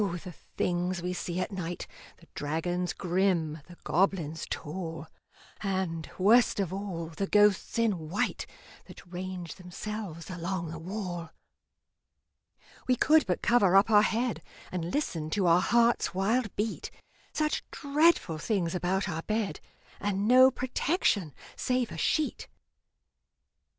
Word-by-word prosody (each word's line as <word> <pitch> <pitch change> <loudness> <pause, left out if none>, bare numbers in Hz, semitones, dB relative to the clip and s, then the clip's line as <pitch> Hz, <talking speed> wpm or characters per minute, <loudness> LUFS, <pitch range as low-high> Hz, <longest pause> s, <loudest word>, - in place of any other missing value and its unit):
the 180 -2 -3 0.2
things 180 +1 0
we 180 0 -1
see 180 0 -3
at 185 - -2
night 180 -3 -4 0.3
The - - -19
dragons 175 +4 -2
grim, 175 -4 0
the 175 -1 -13
goblins 170 -3 0
tall, 165 0 -5 0.6
And, 185 -5 -2
worst 220 +4 +5
of 190 -3 -1
all, 185 -5 -4
the 180 +5 -3
ghosts 210 +1 +3
in 195 -9 0
white 190 - -1 0.4
That - - -13
range 180 -1 -6
themselves 180 -1 -7
along 175 -1 -3
the 165 - -6
wall! 175 -2 -5 1.6
We 255 - +4
could 305 +2 +4
but 180 - -1
cover 205 -6 +4
up 195 +3 +5
our 210 -1 +8
head, 230 +2 0 0.3
And 175 -1 -3
listen 165 - -2
to 195 - +2
our 170 +1 +5
heart's 235 -4 +2
wild 215 +3 +1
beat 215 +1 -2 0.4
Such 305 -1 0
dreadful 290 - +2
things 175 -2 0
about 185 +2 0
our 165 -4 -3
bed, 215 +2 -2 0.4
And 205 0 -1
no 255 +2 +8
protection 255 - 0 0.2
save 250 -2 0
a - - -6
sheet! 305 - 0
190 Hz, 130 wpm, -29 LUFS, 170-215 Hz, 1.6 s, our